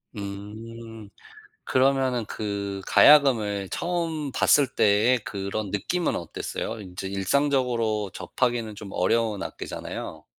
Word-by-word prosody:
음. 110 +2 -8 0.6
그러면은 130 -2 +2
그 100 -2 -4
가야금을 110 -10 +5
처음 165 -5 -2
봤을 145 +1 +4
때의 110 +3 +3
그런 100 +1 -4
느낌은 170 - -1
어땠어요? 110 +5 -5
인제 95 0 -7
일상적으로 115 0 0
접하기는 120 -4 -2
좀 100 -1 -9
어려운 105 +2 +1
악기잖아요. - - -7
110 Hz, 260 characters per minute, -25 LUFS, 100-130 Hz, 0.6 s, 가야금을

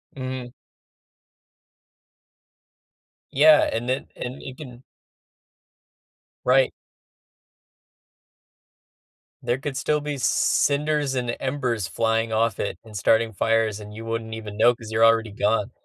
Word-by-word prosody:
Mhm. 130 -2 -5 2.8
Yeah, 150 +2 +6
and 115 +2 -3
then 130 +2 -1
and 125 +2 -6
you 130 - -8
can 130 -4 -11 1.6
Right. 130 +1 +4 2.7
There 120 - 0
could 135 0 -5
still 150 +1 0
be 145 -1 -4
cinders 145 +1 +1
and 120 -2 -2
embers 125 -7 -2
flying 115 +1 0
off 115 +1 +1
it - - -3
and 110 -2 -9
starting 115 +3 +2
fires, 110 0 +1
and 105 0 -10
you 110 +1 -8
wouldn't 115 0 -4
even 110 -2 -7
know 120 +2 +5
'cause 110 -2 -11
you're 110 +1 +4
already 115 -1 +3
gone. 105 0 0
120 Hz, 115 wpm, -24 LUFS, 110-130 Hz, 2.8 s, Yeah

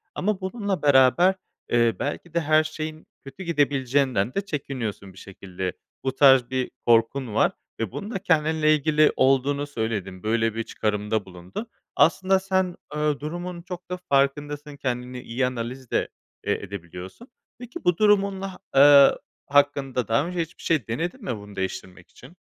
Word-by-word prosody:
Ama 200 0 -1
bununla 200 0 -3
beraber, 145 +7 +5 0.3
eee, 120 -1 +3
belki 155 +4 -4
de 170 - +2
her 155 0 +4
şeyin 155 0 -6 0.2
kötü 135 +7 -9
gidebileceğinden 135 - +1
de 195 - 0
çekiniyorsun. 130 - -5
Bir - - -19
şekilde 95 -2 -6 0.3
bu 130 0 -2
tarz 135 -3 +6
bir 130 -1 -2
korkun 115 +1 +2
var - - +3 0.3
ve 115 -4 -2
bunu 210 +3 -6
da 195 - -3
kendinle 155 -3 +2
ilgili 155 +1 +3
olduğunu 135 +2 +2
söyledin. 105 -7 -4
Böyle 115 0 +1
bir 115 - -2
çıkarımda 105 -1 -2
bulundun. 90 - -8 0.3
Aslında 190 +3 +3
sen, 190 -2 0 0.2
eee, 150 -1 0
durumun 175 +3 -5
çok 180 0 -9
da 180 - -3
farkındasın, 145 +1 0
kendini 125 -1 -4
iyi 125 +3 -1
analiz 125 0 -5
de, - - +1 0.4
eee, - - +2
edebiliyorsun. 95 - -9 0.3
Peki, 250 +8 -9
bu 180 -1 +2
durumunla 195 -3 +1 0.2
eee, 140 0 +8 0.4
hakkında 140 -4 +2
daha 115 +8 +1
önce 180 -1 -2
hiçbir 165 0 -8
şey 155 -10 0
denedin 175 - -3
mi 120 - -3
bunu 105 0 -12
değiştirmek 95 -1 -6
için? 175 - -16
140 Hz, 150 wpm, -24 LUFS, 115-170 Hz, 0.4 s, eee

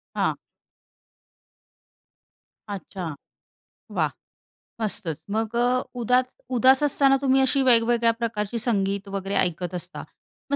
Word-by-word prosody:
हां. - - 0 2.4
अच्छा. 180 -5 -6 0.8
वाह! - - 0 0.7
मस्तच! 165 -7 -2
मग 220 +2 -2
अ, 245 +1 +2
उदात 250 +1 +2 0.3
उदास 260 +3 +5
असताना 275 -1 +4
तुम्ही 270 -1 +3
अशी 265 +1 +2
वेगवेगळ्या 235 -1 +4
प्रकारची 225 -1 -2
संगीत 200 -3 0
वगैरे 195 0 -3
ऐकत 180 +1 0
असता. 175 - -7 0.5
मग - - +3
230 Hz, 100 wpm, -24 LUFS, 195-255 Hz, 2.4 s, उदास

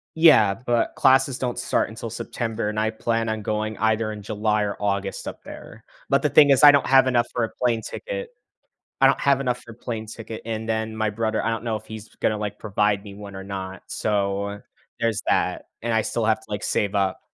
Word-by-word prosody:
Yeah, 130 -12 +6
but 120 -1 +1
classes 130 0 +4
don't 125 -2 -3
start - - 0
until - - -7
September, 115 -2 -3
and 105 0 -2
I 110 0 +1
plan 115 0 -1
on 110 -1 -2
going 110 0 -2
either 110 +1 +1
in 105 -1 -7
July 105 0 0
or 100 -1 -2
August 100 -1 -2
up - - -7
there, - - -11 0.3
but - - +3
the - - +3
thing 145 -2 +6
is 135 +1 +4
I 145 - +11
don't 140 -1 +2
have 135 0 +6
enough 120 -2 +2
for 120 - -1
a 115 - -1
plane 120 -3 0
ticket. - - -6 0.7
I - - +7
don't - - +3
have 140 -1 +3
enough 125 -2 -1
for 115 - -12
a - - -13
plane 110 -2 -5
ticket, 110 0 -8
and 110 0 -4
then 110 0 -2
my 110 -1 0
brother 110 0 -1
I 115 - +1
don't 115 +1 -3
know 110 -2 -1
if 110 +1 -10
he's 110 0 -9
gonna, 105 -1 0
like, 105 -1 -4
provide 105 -1 0
me 100 -2 -10
one 100 -1 -10
or 95 - -6
not. 95 -1 -6
So 100 -1 -1 0.4
there's 115 -2 0
that, - - 0 0.2
and 115 0 -1
I 110 -1 +3
still 115 +1 -2
have 110 +1 +2
to, - - -20
like, 105 0 -3
save 105 0 0
up. 95 -2 0
110 Hz, 230 wpm, -24 LUFS, 105-120 Hz, 0.7 s, I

